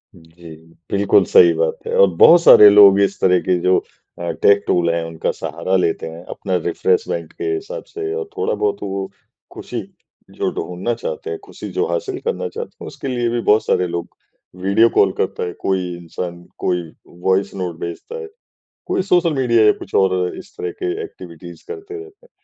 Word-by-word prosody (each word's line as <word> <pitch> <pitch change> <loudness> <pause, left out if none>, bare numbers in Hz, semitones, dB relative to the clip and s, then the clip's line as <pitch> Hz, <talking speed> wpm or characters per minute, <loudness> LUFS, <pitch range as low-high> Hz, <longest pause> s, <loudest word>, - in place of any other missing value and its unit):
जी। 80 -1 -14 0.4
बिल्कुल 100 0 +3
सही 420 -7 +6
बात 475 0 -1
है 475 - -2
और 485 - +7
बहुत 170 0 +8
सारे 105 -10 +9
लोग 100 -1 +7
इस 100 0 0
तरह 90 -1 +4
के 90 -1 0
जो 90 0 +3 0.4
अ, 85 - -4
टेक 100 0 +3
टूल 85 -1 +2
हैं 85 -1 -1
उनका 80 -1 -3
सहारा 95 - -3
लेते 85 -3 0
हैं 85 +2 -10
अपना 95 -2 -3
रिफ्रेशमेंट 450 +2 -1
के 390 - -8
हिसाब 440 +5 -6
से 415 -1 -5
और 445 -2 -5
थोड़ा-बहुत 425 -1 -1
वो 95 0 -4 0.4
खुशी - - -6 0.5
जो - - -1
ढूँढना 90 +7 -3
चाहते 270 - -6
हैं। 430 - -5
खुशी - - -9
जो - - +2
हासिल 400 -6 -3
करना 470 0 -2
चाहते 475 +2 -8
हैं - - -7
उसके - - -8
लिए 120 -2 -1
भी 120 0 -1
बहुत 110 +1 +4
सारे 90 - +1
लोग 85 0 -4 0.6
वीडियो 105 +4 +4
कॉल - - +3
करता - - -2
है। 90 -1 -4
कोई 95 -1 0
इंसान 85 +1 -7
कोई 90 -1 -1 0.4
वॉइस 95 +1 +1
नोट 90 -3 -4
भेजता 85 - -7
है। 445 - -8 0.6
कोई - - 0
सोशल 175 -2 +3
मीडिया 120 -4 +3
या - - +6
कुछ - - -11
और 90 -1 -1
इस 190 - -13
तरह 425 0 -3
के 365 -1 0
एक्टिविटीज़ 430 +4 -12
करते 410 -2 -8
रहते 415 +3 -17
हैं। - - -35
105 Hz, 185 wpm, -19 LUFS, -, 0.6 s, सारे